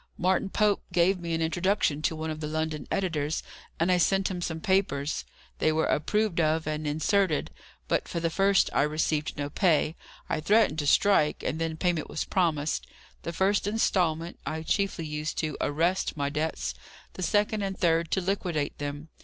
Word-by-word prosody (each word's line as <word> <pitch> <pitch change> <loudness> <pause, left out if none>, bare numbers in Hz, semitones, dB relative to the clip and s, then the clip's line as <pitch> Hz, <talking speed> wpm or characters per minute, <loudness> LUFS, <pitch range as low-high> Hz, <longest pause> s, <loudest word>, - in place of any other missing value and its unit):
Martin 185 +2 +1
Pope 210 0 +2
gave 180 +2 +3
me 170 -1 -2
an 165 - 0
introduction 165 -2 +1
to 160 +1 0
one 160 0 -3
of 155 - -5
the 150 - -3
London 155 -1 -3
editors, 160 -5 -1 0.4
and 170 +3 +2
I 180 - +4
sent 195 +2 +2
him 180 -1 -4
some 160 -2 -3
papers. 160 -6 0 0.3
They 155 - +3
were 160 +1 +1
approved 210 +3 +1
of 160 0 +1
and 155 0 -2
inserted: 160 +3 +1 0.4
but - - 0
for 170 - -3
the 165 0 -1
first 195 +2 +3
I 130 - +3
received 155 +1 0
no 145 -1 -2
pay. 160 -4 +2 0.3
I - - -1
threatened 195 -2 +3
to 145 - -1
strike, 155 -3 +3
and 160 - -2
then 160 -1 -2
payment 175 -3 0
was - - -3
promised. 160 -5 0 0.3
The 170 - -4
first 195 +4 +1
instalment, 175 -6 0
I 160 0 -4
chiefly 195 -2 0
used 150 0 -4
to 155 -3 -1
arrest 165 +4 0
my 140 0 -1
debts; 150 - -2 0.4
the - - -8
second 210 +2 +1
and 195 -1 -3
third 165 -1 +2
to 190 - +1
liquidate 175 -6 -2
them. 145 +2 -5
165 Hz, 180 wpm, -28 LUFS, 155-190 Hz, 0.4 s, I